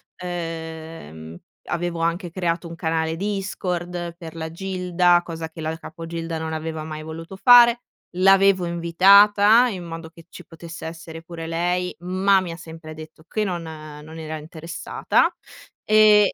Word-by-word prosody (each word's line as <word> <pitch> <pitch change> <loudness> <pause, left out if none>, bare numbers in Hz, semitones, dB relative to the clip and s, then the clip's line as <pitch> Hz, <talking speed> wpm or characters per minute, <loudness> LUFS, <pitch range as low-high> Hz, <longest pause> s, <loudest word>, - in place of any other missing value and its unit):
Ehm, 160 - -7 0.3
avevo 170 -1 -3
anche 170 +2 -1
creato 170 -1 -2
un 165 - -8
canale 160 0 -1
Discord 180 -3 -3
per 165 -2 -10
la 160 0 -5
gilda, 180 -1 +2
cosa 165 -1 -6
che 160 0 -10
la 160 +1 -2
capo 165 0 -9
gilda 165 -1 -4
non 160 0 -4
aveva 160 0 -4
mai 155 0 -6
voluto 165 +4 -8
fare. 240 +2 +7 0.4
L'avevo 195 -1 +5
invitata, 200 +7 +5
in 185 -5 -6
modo 165 -1 -7
che 165 0 -17
ci - - -12
potesse 165 0 -10
essere 165 0 -8
pure 165 -1 -7
lei, 175 +2 -1
ma 190 +2 +2
mi 175 -2 -5
ha 165 - -7
sempre 160 -2 -10
detto 155 0 -12
che 215 - -1
non 180 -4 -2
non 155 0 -10
era 155 0 -5
interessata 160 +2 -1 0.5
e 215 -1 +6
170 Hz, 150 wpm, -23 LUFS, 160-185 Hz, 0.5 s, fare